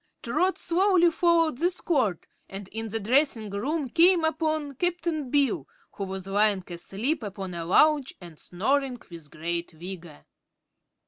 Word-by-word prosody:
Trot 375 +1 +1
slowly 355 -1 +3
followed 330 -5 +2
this 355 +1 +1
cord 255 - 0 0.2
and 195 0 -8
in 225 +1 -5
the 225 +1 -3
dressing 230 -1 +1
room 275 +9 -2
came 340 +5 +4
upon 310 -2 -1
Cap'n 335 -2 -2
Bill, 280 0 +1 0.2
who 200 - -5
was 190 -1 -6
lying 200 -1 +2
asleep 200 - -2
upon 195 -3 -6
a 170 -1 -5
lounge 290 - +3
and 170 -4 -12
snoring 255 +7 -1
with 165 -3 -10
great 170 +3 -4
vigor. 170 -2 -10
245 Hz, 140 wpm, -26 LUFS, 190-315 Hz, 0.2 s, came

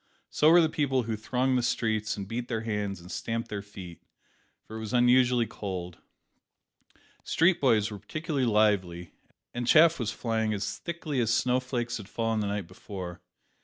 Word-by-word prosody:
So 155 - +4
were 175 +1 +7
the 160 - +4
people 135 -5 0
who 110 -1 -2
thronged 125 +4 0
the - - 0
streets 110 -3 -1
and 100 -1 -5
beat 120 +3 -4
their 115 -3 -2
hands 105 -4 -3
and 90 +2 -12
stamped 115 0 -3
their 100 -1 -4
feet 95 -4 -11 0.6
for 110 - -9
it - - -5
was 110 0 -6
unusually 125 0 +4
cold. 95 -5 -6 1.2
Street 170 +2 +2
boys 110 -5 +3
were 105 - -7
particularly 140 - -2
lively, 95 -6 +1 0.4
and 120 0 -3
chaff 160 +4 +6
was 110 -3 -1
flying 110 -2 -1
as 100 0 -4
thickly 160 -5 -4
as 115 -2 +1
snow 125 +1 +2
flakes 120 -2 -3
had 105 -2 -10
fallen 115 -1 -1
the 105 - -1
night 100 -2 -2
before. 95 -1 -8
115 Hz, 175 wpm, -28 LUFS, 105-125 Hz, 1.2 s, were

